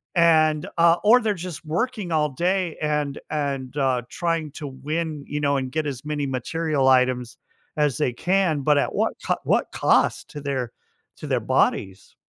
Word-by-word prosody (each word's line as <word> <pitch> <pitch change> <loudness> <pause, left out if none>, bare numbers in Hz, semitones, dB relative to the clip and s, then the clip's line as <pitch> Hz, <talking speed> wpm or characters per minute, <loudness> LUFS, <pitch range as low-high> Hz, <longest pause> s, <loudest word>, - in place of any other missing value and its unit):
and, 155 -3 +4
uh, 170 0 +5
or 245 +4 +6
they're, 215 -2 +1
just, 180 -3 -7
working 210 +3 -2
all 155 -2 +2
day 175 +4 -1
and 150 -2 -1
and, 140 -3 -3
uh, 130 -3 +1
trying 165 -4 -2
to 150 -2 -6
win, 150 +3 -4
you 150 - -3
know, 140 -1 +2
and 130 -1 -3
get 155 -1 -1
as 135 0 -6
many 150 -1 -2
material 140 +2 -1
items 125 -2 +2 0.4
as 150 -4 +1
they 130 -5 0
can, 175 -1 +1
but, 145 +1 +3
at - - 0
what - - +1
c - - 0
what - - +1
cost - - +2
to 145 - -7
their 130 -4 -3 0.5
to - - -8
their - - +1
bodies? 95 0 0
150 Hz, 175 wpm, -23 LUFS, 135-165 Hz, 0.5 s, or